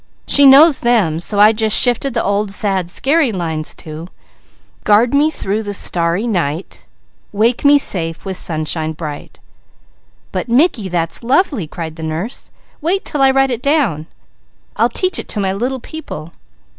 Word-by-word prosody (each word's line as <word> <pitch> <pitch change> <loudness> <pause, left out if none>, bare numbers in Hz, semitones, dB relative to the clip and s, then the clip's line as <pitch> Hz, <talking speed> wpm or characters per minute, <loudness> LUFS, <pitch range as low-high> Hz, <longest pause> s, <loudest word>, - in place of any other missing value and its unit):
She 285 -1 +5
knows 280 +2 +7
them, 215 -10 +1
so 200 +4 -3
I 210 +1 +7
just 220 -1 +2
shifted 245 +1 +2
the 230 - 0
old 200 +1 -1
sad, 195 -4 -2
scary 280 - +1
lines 160 -5 -4
to: 160 +1 -9 0.8
"Guard 220 +4 +3
me 290 +2 +3
through 210 -8 -3
the 205 -2 -4
starry 170 +3 0
night, 170 -6 -3 0.4
Wake 225 +4 0
me 290 0 +6
safe 165 - -1
with 190 -1 -4
sunshine 155 -1 -2
bright!" 150 -2 -8 0.9
"But - - -4
Mickey, 240 - +2
that's 165 -2 -2
lovely!" 255 - 0
cried 160 0 -7
the - - -9
nurse. 160 +10 -5 0.3
"Wait 360 +6 -1
till 290 - -2
I 270 - +5
write 270 0 +2
it 240 -1 -3
down! 250 - 0 0.7
I'll - - +2
teach 370 0 -2
it - - -7
to 210 - -3
my 190 -1 -1
little 250 +6 -3
people. 170 - -9
210 Hz, 160 wpm, -16 LUFS, 170-265 Hz, 0.9 s, knows